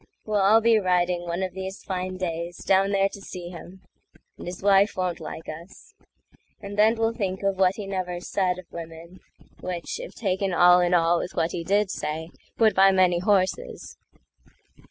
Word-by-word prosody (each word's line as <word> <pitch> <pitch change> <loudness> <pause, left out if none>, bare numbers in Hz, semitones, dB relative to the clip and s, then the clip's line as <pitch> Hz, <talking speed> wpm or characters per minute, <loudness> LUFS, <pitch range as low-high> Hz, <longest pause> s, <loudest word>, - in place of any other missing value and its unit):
We'll 210 -2 0
all 215 +4 +5
be 225 -1 +4
riding, 180 -2 0
one 170 +2 -2
of 185 - -4
these 190 +1 -7
fine 185 -1 -4
days, 170 -1 -4
Down 195 +1 +3
there 195 -1 +2
to 200 - -11
see 180 -2 -8
him—and 180 +1 -14
his 180 +1 -7
wife 200 0 +4
won't 180 -2 -2
like 160 - -8
us; 165 +4 -11 0.7
And 200 0 -8
then 215 +2 +4
we'll 225 0 0
think 195 -4 -3
of 195 -1 0
what 185 0 +3
he 210 - -6
never 185 -2 -3
saidOf 185 0 -2
women—which, 170 - -8
if - - -9
taken 190 -3 -1
all 180 0 +6
in 175 0 +1
allWith 170 +1 +1
what 165 -1 0
he 170 - -4
did 200 +2 +1
say, 160 +2 -4 0.3
would 220 -2 +4
buy 195 +1 +6
many 185 -2 +3
horses. 205 - -1
185 Hz, 170 wpm, -25 LUFS, 175-195 Hz, 0.7 s, all